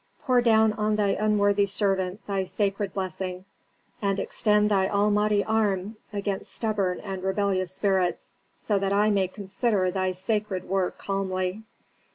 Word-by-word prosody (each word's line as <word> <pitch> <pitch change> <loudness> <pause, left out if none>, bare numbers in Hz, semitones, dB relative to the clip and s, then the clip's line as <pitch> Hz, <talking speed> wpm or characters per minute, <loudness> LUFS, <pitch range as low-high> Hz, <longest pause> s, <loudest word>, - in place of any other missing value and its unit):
Pour 250 -2 +3
down 220 -2 +4
on 215 0 0
thy 205 -1 +1
unworthy 205 -1 +2
servant 195 -1 -1
thy 195 -1 -1
sacred 200 +1 -1
blessing, 185 -1 -4 0.6
and 200 -1 0
extend 210 -1 +1
thy 190 -2 +3
almighty 210 0 +2
arm 210 -2 0 0.2
against 200 -2 -3
stubborn 205 -5 -1
and 195 -2 -5
rebellious 190 -1 0
spirits, 185 -3 0 0.2
so 205 -2 0
that 195 0 0
I 210 +1 +3
may 195 -2 +2
consider 195 0 -1
thy 185 0 -1
sacred 195 0 -2
work 190 -1 -1
calmly." 190 0 -2
200 Hz, 140 wpm, -26 LUFS, 190-210 Hz, 0.6 s, down